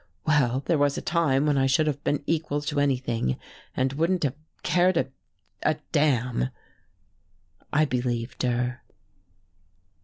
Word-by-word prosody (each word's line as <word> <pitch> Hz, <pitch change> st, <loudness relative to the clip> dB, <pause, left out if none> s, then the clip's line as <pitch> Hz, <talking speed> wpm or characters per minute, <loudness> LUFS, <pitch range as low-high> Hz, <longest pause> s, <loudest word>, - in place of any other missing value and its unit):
Well, 135 Hz, -4 st, +2 dB
there 165 Hz, -, +2 dB
was 145 Hz, -1 st, +2 dB
a -, -, -2 dB
time 150 Hz, -5 st, +2 dB
when 145 Hz, -2 st, +2 dB
I 135 Hz, -, +3 dB
should 135 Hz, +4 st, +3 dB
have 145 Hz, -1 st, -2 dB
been 145 Hz, -1 st, 0 dB
equal 155 Hz, -2 st, 0 dB
to 145 Hz, 0 st, -1 dB
anything 125 Hz, -, 0 dB, 0.4 s
and 130 Hz, +1 st, +1 dB
wouldn't 165 Hz, +4 st, +1 dB
have 135 Hz, -3 st, +1 dB, 0.3 s
cared 180 Hz, +1 st, +3 dB
a 130 Hz, 0 st, 0 dB, 0.5 s
a 155 Hz, -1 st, +1 dB
damn." 125 Hz, -, +2 dB, 1.2 s
I 155 Hz, +1 st, +4 dB
believed 120 Hz, -3 st, -2 dB
her.... 125 Hz, 0 st, 0 dB
140 Hz, 135 wpm, -26 LUFS, 125-155 Hz, 1.2 s, I